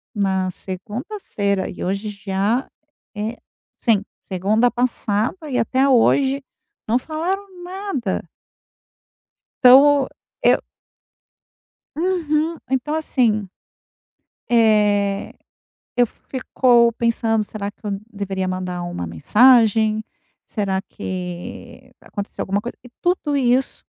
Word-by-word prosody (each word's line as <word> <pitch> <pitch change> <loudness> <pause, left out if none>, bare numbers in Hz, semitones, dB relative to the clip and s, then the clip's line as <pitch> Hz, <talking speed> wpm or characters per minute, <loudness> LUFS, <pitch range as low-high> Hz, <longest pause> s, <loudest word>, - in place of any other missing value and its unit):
na 190 -2 +1
segunda-feira 200 - -3
e - - -7
hoje 200 +3 -2
já 200 +4 -1 0.5
é, 220 +3 -3 0.4
assim, 215 -5 +3 0.2
segunda 210 +6 +1
passada 245 - -1
e 250 - -1
até 260 +4 +2
hoje 270 +2 +3 0.4
não 230 - +3
falaram 350 +8 -3 0.2
nada. 355 - -3 1.3
Então, 275 +2 +7 0.4
eu - - +6 1.4
Uhum. 325 -1 0
Então, 265 +3 0
assim, 230 -10 +1 1.0
eh, 210 -3 +3 0.6
eu 245 -1 +5
ficou 245 -1 +2
pensando: 230 -1 +1
"Será 205 -1 -5
que 215 - -35
eu 200 -1 -2
deveria 195 -2 -3
mandar 180 -1 -3
uma 130 - -4
mensagem? 220 - +4 0.4
Será 195 -3 -1
que 190 +7 -7
aconteceu 200 -1 -6
alguma 200 +2 0
coisa?". 235 - -7
E - - -11
tudo 350 -5 0
isso 255 0 +1
225 Hz, 100 wpm, -21 LUFS, 200-265 Hz, 1.4 s, Então